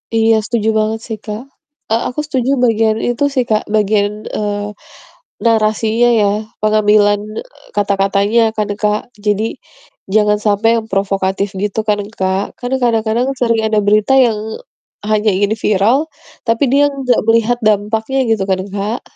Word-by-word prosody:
Iya, 225 0 +4
setuju 220 -2 -1
banget 220 +1 -1
sih, 225 - -3
Kak, 215 +3 -5 0.5
a - - +4 0.2
aku 250 - -6
setuju 265 -2 0
bagian 225 -2 +2
itu 245 +3 -1
sih, 255 -3 +2
Kak, 215 -1 +1
bagian, 210 0 0
eee, 205 -1 -2 0.8
narasinya 220 +1 +2
ya, 205 - +3 0.4
pengambilan, 210 -1 +3 0.2
eee, - - -22
kata-katanya 200 +2 +1 0.2
kan, 210 -1 -1
Kak. 210 +3 -1
Jadi, 210 +1 +1 1.0
sampai 210 +2 +2
yang 220 - -10
provokatif 195 0 -1
gitu 210 +1 -2
kan, 210 -1 +2 0.2
Kak. 190 +1 0 0.2
Kan 245 0 -5
kadang-kadang 230 +1 +1
sering 230 -2 +1
ada 215 - 0
berita 210 +4 +3
yang 220 -3 -1 0.6
hanya 215 0 +1
ingin 205 +2 +1
viral, 210 +5 +3 0.5
tapi 230 +3 +2
dia 285 +1 +4
nggak 270 -4 0
melihat 230 +1 +3
dampaknya, 220 +5 0
gitu 210 -3 +1
kan, 190 -1 +1
Kak. 205 +4 -3
215 Hz, 140 wpm, -16 LUFS, 205-230 Hz, 1.0 s, Iya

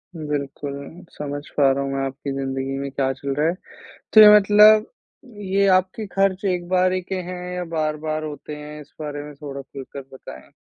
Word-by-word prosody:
बिल्कुल। 145 -2 -4 0.4
समझ 145 -1 -4 0.2
पा 140 -2 +5
रहा 140 +1 -1
हूँ 135 - -3
मैं 135 0 -1
आपकी 135 +1 -5
ज़िंदगी 135 0 -3
में 140 0 -4
क्या 135 -1 0
चल 135 +1 -4
रहा 150 +2 +1
है। 170 - +1 0.6
तो 215 - +9
ये 210 - +11
मतलब 210 +2 +6 0.7
ये 200 0 +4
आपके 190 +3 -5
खर्च 195 0 +1
एक 180 -2 -1
बारी 185 0 +2
के 190 +2 -5 0.2
हैं 180 -1 -6
या 180 0 -3
बार-बार 155 0 -2
होते 150 0 -7
हैं? 150 0 -9
इस 145 - -15
बारे 145 -1 -5
में 150 0 -10
थोड़ा 140 -1 -8
खुल 135 0 -10
कर 140 - -6
बताएँ। 65 - -12
150 Hz, 190 wpm, -22 LUFS, 140-180 Hz, 0.7 s, ये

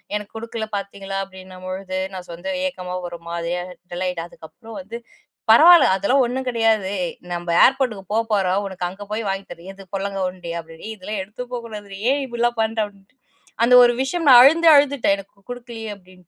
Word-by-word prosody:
"எனக்கு 210 -1 -5
குடுக்கல 225 -1 -5
பாத்தீங்களா?" 195 0 -6
அப்டின்னும்பொழுது 185 0 -7
நான் 185 -1 -8
சொந்த 175 +12 -5
ஏக்கமா, 180 -8 -6
ஒரு 170 - -9
மாரியா 170 +1 -3 0.3
டல்லாயிட்டேன். 175 -1 -3
அதுக்கப்பறம் 225 - -12
வந்து, 235 -3 -8 0.5
"பரவால்ல, 330 - +8
அதெல்லாம் 255 +8 +2
ஒண்ணும் 260 +2 -3
கெடையாது. 225 -4 +1 0.2
ஏய் 170 - -6 0.2
நம்ப 175 0 -5 0.2
ஏர்போர்ட்டுக்கு 250 -7 0
போபோறோம் 205 -4 +1
உனக்கு 180 -2 -4
அங்க 195 +3 -10
போயி 220 +1 -3
வாங்கித் 195 -1 -4
தரேன்" 175 +3 -11
"எது 195 -1 -15
பொல்லாங்கா 195 0 -3
உருண்டயா?" 170 -2 -6
அப்டின்னு 165 +5 -12
ஏ, 220 - -4
இதெல்லாம் 200 +1 -4
எடுத்து 235 +5 -9
போக்கூடாதுரி! 210 -5 -7
ஏன், 280 +1 +1
இப்டிலாம் 240 -1 -1
பண்ற?" 220 0 -2
அப்டின்ட்டு 200 +4 -23 0.5
அந்த 240 +2 +4
ஒரு 240 - +5
விஷயம் 330 +5 -2
நான் 250 -2 +10
அழுந்து 330 +5 +5
அழுதுட்டேன், 280 -8 +3
எனக்கு 195 0 -16
குடுக்கலயே 235 -2 -7
அப்டின்ட்டு. 185 -2 -21
200 Hz, 170 wpm, -21 LUFS, 185-235 Hz, 0.5 s, நான்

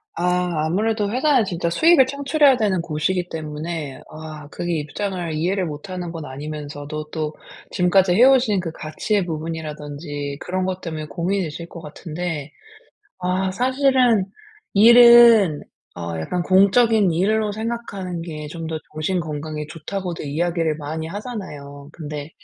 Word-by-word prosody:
아 180 -2 0
아무래도 210 +3 0
회사는 260 -1 +3
진짜 170 -3 -2
수익을 320 - +5
창출해야 280 0 +3
되는 195 -5 +1
곳이기 175 +3 -1
때문에 155 -2 -5
아 155 -1 -9
그게 175 0 -3
입장을 175 +2 -4
이해를 180 +5 0
못 150 +3 -7
하는 180 -2 -5
건 165 -3 -7
아니면서도 150 +2 -6
또 155 -1 -3 0.4
지금까지 180 0 +3
해오신 245 -2 +5
그 165 -3 -4
가치의 185 +6 -2
부분이라든지 150 -3 -5
그런 185 +1 -2
것 185 0 -3
때문에 160 -2 -5
고민이실 170 -2 -3
것 170 - -10
같은데, 155 -1 -5 0.7
아 185 +1 -1
사실은 255 -2 +3 0.5
일은 235 -6 +8 0.4
어 85 -1 -4
약간 175 - -2
공적인 200 +1 +4
일로 210 +5 +1
생각하는 205 -5 -4
게 155 -3 -6
좀 165 +1 -6
더 160 - -3 0.2
정신 165 +4 -1
건강에 155 -1 -5
좋다고도 175 +2 -5
이야기를 165 +2 -1
많이 160 +2 -5
하잖아요. 150 - -7
근데 150 -2 -7
175 Hz, 315 characters per minute, -22 LUFS, 155-200 Hz, 0.7 s, 일은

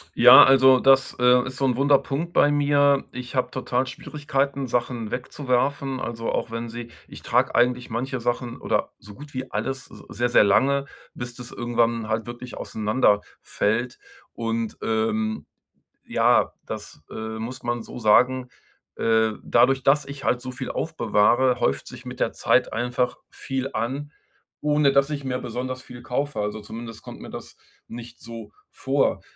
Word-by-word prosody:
Ja, - - +10
also 130 -1 +6
das, 135 0 +4
äh, 125 0 +5
ist 135 -1 -6
so 135 - -1
'n 125 -2 +1
wunder 140 +1 +4
Punkt 160 +7 -4
bei 145 - +4
mir. 145 -1 +3
Ich 125 +1 -7
habe 130 - 0
total 130 0 -1
Schwierigkeiten, 140 0 -3
Sachen 120 -2 -2
wegzuwerfen, 135 +1 -1
also, 115 -2 -3
auch - - -2
wenn 115 +1 -4
sie 120 0 -8 0.2
ich - - -12
trage - - +1
eigentlich 125 0 +2
manche 125 +3 -3
Sachen 120 0 -2
oder - - -1
so 105 0 -13
gut 145 +5 -13
wie 130 0 -5
alles 130 +5 -3
s - - -14
sehr, 120 0 -1
sehr 120 - +5
lange, 140 +7 +3 0.3
bis 120 -1 -7
das 125 -1 -10
irgendwann 115 -1 0
halt 110 +1 -2
wirklich 120 0 -8
auseinanderfällt. 110 +1 -1 0.3
Und, 115 -1 -3
ähm, 110 -1 -1 0.6
ja, - - +2
das, - - -8
äh, 110 0 -6
muss 125 +4 -6
man 120 0 -2
so - - -10
sagen, 125 +3 +3 0.5
äh, 110 -1 +2
dadurch, 130 +2 +3
dass 140 +1 +3
ich 140 0 -9
halt 125 - +1
so 130 0 -6
viel 130 +1 -6
aufbewahre, 120 -3 +2
häuft 70 0 0
sich - - -10
mit - - -8
der - - 0
Zeit - - +2
einfach 125 +2 -1
viel 135 0 -4
an, 135 +6 -3 0.5
ohne 150 -1 +3
dass 140 +1 +3
ich 145 -2 -4
mir 130 -1 -2
besonders 130 +2 -5
viel 120 -1 -12
kaufe. 130 0 -3
Also, 105 +1 -3
zumindest 115 +1 -9
kommt - - -11
mir - - -9
das - - -9 0.3
nicht 120 0 -10
so 115 -1 -10 0.2
vor. - - 0
125 Hz, 165 wpm, -24 LUFS, 115-135 Hz, 0.6 s, Ja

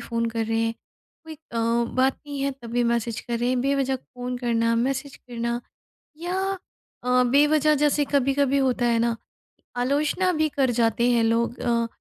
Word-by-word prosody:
Phone 230 -1 -2
कर 225 0 -1
रहे 225 0 0
हैं, 225 0 -1 0.5
कोई 320 0 -8
अ, 290 -6 -8 0.4
बात 260 +1 +2
नहीं 285 -1 -5
है 275 - +1
तब 235 - -8
भी 245 +1 +1
मैसेज 235 -1 -1
कर 235 -1 -3
रहे 240 +1 0
हैं। 255 0 +1
बेवजह 270 0 +1
फ़ोन 250 0 -7
करना, 230 -1 +1
मैसेज 270 +3 -2
करना 235 -1 -4 0.6
या 350 +2 -2 0.7
अ, 250 0 +3
बेवजह 295 +4 +4
जैसे 295 0 +2
कभी-कभी 275 0 +2
होता 255 -2 +1
है 230 -1 +2
ना 235 0 +1 0.6
आलोचना 295 +8 +1
भी 310 -1 +2
कर 270 -3 +1
जाते 235 0 +2
हैं 235 -1 +3
लोग। 230 +2 +1
अ 235 -1 +1
250 Hz, 175 wpm, -24 LUFS, 235-280 Hz, 0.7 s, बेवजह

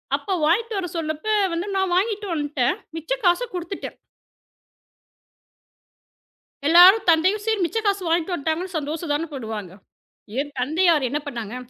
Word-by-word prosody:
அப்ப 385 -2 -2
வாங்கிட்டு 430 +7 +1
வர 370 -2 -2
சொன்னப்ப 315 +6 -2 0.2
வந்து, 335 +2 -2
நான் 380 -2 0
வாங்கிட்டு 410 +2 0
வந்துட்டேன், 290 0 0 0.2
மிச்ச 325 +9 -9
காச 355 +7 +3
கொடுத்துட்டேன். 355 +1 -6 2.7
எல்லாரும் 360 +6 +8
தந்தையும் 370 +6 +3
சரி 445 -2 0
மிச்ச 395 - -3
காசு 400 -2 +1
வாங்கிட்டு 335 +2 0
வந்துட்டாங்கன்னு 340 +3 -3
சந்தோஷம் 305 +1 -4
தான 315 +3 -1
படுவாங்க. 220 -8 -6 0.7
என் 290 +1 -5
தந்தையார் 315 +1 +2
என்ன 295 - -1
பண்ணாங்க? 235 -5 -6
335 Hz, 130 wpm, -23 LUFS, 295-385 Hz, 2.7 s, எல்லாரும்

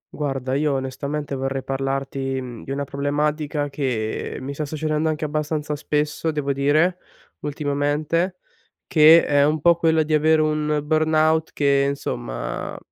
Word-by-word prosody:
Guarda, 135 -3 -2
io 145 +1 +1
onestamente 140 +2 -3
vorrei 135 0 -2
parlarti, 135 0 -2
mhmm, 125 -3 -8
di - - -11
una 140 +1 -2
problematica, 145 +1 -1
che 125 -6 -3
mi 135 +2 -5
sta 150 - -3
succedendo 155 +1 -1
anche 155 0 -2
abbastanza 150 0 -2
spesso 150 +2 -1
devo 145 -3 -1
dire, 155 +6 +2 0.4
ultimamente 150 +4 -1 0.5
che 160 +1 +7
è 145 -1 +3
un 155 +2 +2
po' 170 +3 +5
quello 160 -1 +2
di 155 +1 -2
avere 155 +1 +4
un 150 -1 0
burnout 155 +1 +2
che 140 -1 +2
insomma, - - -4
150 Hz, 140 wpm, -22 LUFS, 140-155 Hz, 0.5 s, che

